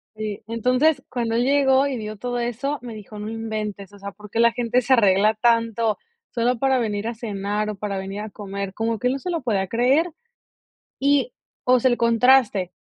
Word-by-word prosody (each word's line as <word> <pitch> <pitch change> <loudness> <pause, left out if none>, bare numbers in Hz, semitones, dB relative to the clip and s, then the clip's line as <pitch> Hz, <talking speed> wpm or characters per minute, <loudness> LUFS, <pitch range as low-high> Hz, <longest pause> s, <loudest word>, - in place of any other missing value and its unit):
Y, 215 -2 -5
entonces, 255 +6 +2
cuando 235 -3 -2
él 235 - +2
llegó 270 0 +3
y 270 -2 -3
vio 215 -1 -6
todo 245 +3 -3
eso, 245 +5 -2
me 240 -1 -8
dijo: 210 0 -10
"No 210 +1 -5
inventes, 215 -3 -5
o 205 - -14
sea, 200 0 -7
¿por 210 +2 -14
qué 225 - -3
la 235 0 +5
gente 245 +1 +1
se 255 +2 +2
arregla 205 -2 +4
tanto 230 -1 +1 0.3
solo 240 0 0
para 265 0 +2
venir 215 -3 -2
a 235 - -3
cenar 210 -1 -3
o 210 - -4
para 200 0 -4
venir 195 +2 -5
a 215 - -6
comer?", 200 -2 -6
como 225 0 -1
que 250 - 0
él 250 - +1
no 275 - -3
se 360 - -4
lo 335 - -2
podía 205 -6 0
creer. 265 - +2 0.9
Y, 285 - +2 0.3
o 250 0 +4
sea, 260 - +3
el 240 - +2
contraste. 235 -5 +3
230 Hz, 210 wpm, -23 LUFS, 210-250 Hz, 0.9 s, la